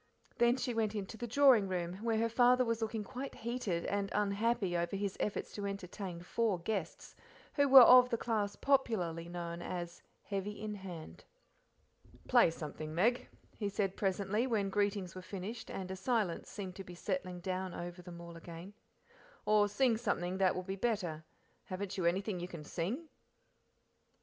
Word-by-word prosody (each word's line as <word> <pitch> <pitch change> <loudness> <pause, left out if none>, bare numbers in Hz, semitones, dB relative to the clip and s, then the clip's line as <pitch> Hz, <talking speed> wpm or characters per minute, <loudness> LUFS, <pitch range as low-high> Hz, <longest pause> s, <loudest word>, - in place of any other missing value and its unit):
Then 240 +2 +4
she 250 -1 -2
went 220 -2 0
into 205 +1 -4
the 240 +2 -5
drawing 245 -4 +6
roam, 175 -2 -2
where 230 -1 +1
her 230 +1 +2
father 250 +2 +4
was 230 -1 -1
looking 220 -1 -2
quite 265 +5 -6
heated 220 -7 -2
and 200 0 -1
unhappy 205 -1 +1
over 170 +2 -1
his 200 -1 -2
efforts 210 - -2
to 205 -1 -3
entertain 190 -2 -5
four 215 +1 0
guests 185 0 -4 0.4
who 285 -1 +3
were 265 -1 +12
of 250 +1 +8
the 230 - 0
class 215 -4 -1
popularly 185 -12 +1
known 170 -1 -5
as 175 -1 -5 0.2
"heavy 200 +1 -4
in 215 0 -4
hand:" 185 -5 -9 1.0
"Play 240 -7 +6
something, 155 -1 -6
Meg," 235 +8 +2 0.3
he 205 -3 -1
said 195 -1 -1
presently, 200 +4 0
when 205 -5 0
greetings 200 -3 0
were 185 - -7
finished, 200 +5 -6
and 190 -1 -5
a - - -3
silence 200 -3 -1
seemed 195 -2 -6 0.2
settling 180 -5 -3
down 185 0 -3
over 175 +1 -6
them 175 -1 -10
all 170 0 -9
again; 170 +3 -9 0.7
"or 210 -1 +4
sing 235 +2 +2
something 185 -5 -1
that 190 -2 +3
will 185 - -3
be 190 +1 -4
better 190 -7 -1 0.4
haven't 190 +1 -4
you 185 - -1
anything 190 +2 0
you 175 - -4
can 170 -4 -8
sing?" 200 - -3
200 Hz, 165 wpm, -34 LUFS, 180-225 Hz, 1.0 s, were